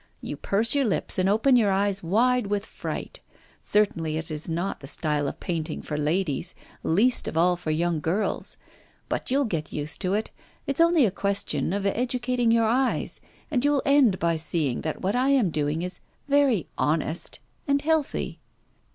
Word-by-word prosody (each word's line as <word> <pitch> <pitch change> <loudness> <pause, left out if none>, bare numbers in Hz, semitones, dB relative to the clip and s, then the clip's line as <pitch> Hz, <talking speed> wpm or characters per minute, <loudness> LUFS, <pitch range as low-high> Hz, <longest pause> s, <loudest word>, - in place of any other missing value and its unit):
You - - -5
purse 220 +4 +1
your 280 -2 +2
lips 200 -3 -1
and 185 +1 +3
open 225 +6 +4
your 220 -4 +4
eyes 195 0 +1
wide 235 +6 +2
with 205 0 -1
fright. - - -6 0.4
Certainly 165 -7 +1
it 160 0 -4
is 155 +2 -4
not 170 +4 -2
the 135 - -9
style 150 -1 +1
of - - -5
painting 165 -3 -3
for 150 - -4
ladies, 155 +2 -1 0.3
least 225 +10 +2
of - - -3
all 175 +2 +4
for 175 -2 -6
young 165 +1 0
girls. 190 +7 -1 0.5
But - - -2
you'll 275 +2 +2
get 165 -8 -3
used 150 0 -4
to 190 +1 +1
it; 215 - -2 0.3
it's 280 +2 0
only 335 -5 +5
a 205 - +1
question 200 -3 -1
of 200 +1 -2
educating 245 +2 0
your 230 0 +4
eyes 255 +4 0 0.3
and 255 -4 +1
you'll 290 -1 +2
end 275 -9 +4
by 170 -1 +1
seeing 155 -5 -1
that 155 - -3
what 195 +4 0
I 255 +2 +2
am 255 -10 +3
doing 150 +2 -1
is 180 0 -4 0.3
very 280 - +3
honest 155 +2 0 0.3
and 280 0 +3
healthy. 310 0 -1
195 Hz, 175 wpm, -26 LUFS, 165-250 Hz, 0.5 s, only